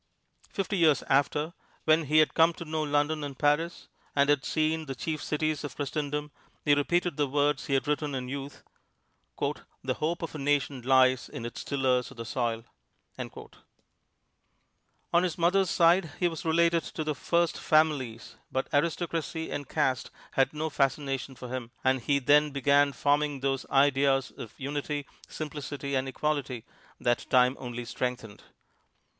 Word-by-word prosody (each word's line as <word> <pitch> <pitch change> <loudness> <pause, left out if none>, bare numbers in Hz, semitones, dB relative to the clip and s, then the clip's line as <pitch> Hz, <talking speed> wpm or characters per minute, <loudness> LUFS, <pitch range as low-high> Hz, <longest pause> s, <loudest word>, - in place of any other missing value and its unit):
Fifty 195 0 -2
years 155 -6 +4
after, 150 +4 +2 0.3
when 155 0 +4
he 150 +2 +2
had 155 -1 +5
come 165 +1 +5
to 170 - -8
know 155 0 -2
London 145 +1 0
and 140 -2 -6
Paris, 150 +5 +1 0.3
and 140 0 +3
had 145 -2 +2
seen 155 0 0
the 135 - -4
chief 155 +3 -3
cities 155 0 -1
of 145 - -6
Christendom, 150 +1 -3 0.3
he 145 - +5
repeated 170 +3 +1
the 145 -1 +2
words 145 +1 +1
he 135 - +1
had 135 - 0
written 150 -1 -1
in 125 -1 -4
youth, 140 +1 -6 0.7
"The - - -3
hope 165 +3 -1
of 165 - -4
a 155 - -6
nation 140 -2 0
lies 130 0 +4
in 115 - -6
its 120 - -6
tillers 130 -3 +1
of 135 - -14
the 115 - -5
soil!" 115 -2 -2 0.5
On - - -5 1.9
his 180 -3 -1
mother's 180 +2 +3
side 170 0 +4
he 180 - +3
was 165 -2 -5
related 170 +1 +3
to 155 - -4
the 150 0 -1
"first 170 +3 0
families," 145 -7 +1
but 130 - -2
aristocracy 160 +1 -1
and 145 -2 -4
caste 130 -1 0 0.2
had 135 - +2
no 155 +1 -3
fascination 135 -1 -1
for 125 +1 -8
him, 125 -2 -4
and 130 -1 +2
he 140 +4 +2
then 145 +3 +4
began 140 +1 +3
forming 145 0 +1
those 135 -1 -1
ideas 135 -1 +3
of 110 -2 -9
utility, 145 +1 -3 0.2
simplicity 145 -2 -5
and 130 0 0
equality 135 -4 -2 0.3
that 120 -1 0
time 125 0 +4
only 120 -1 -5
strengthened. 115 -3 -4
145 Hz, 160 wpm, -28 LUFS, 135-155 Hz, 1.9 s, had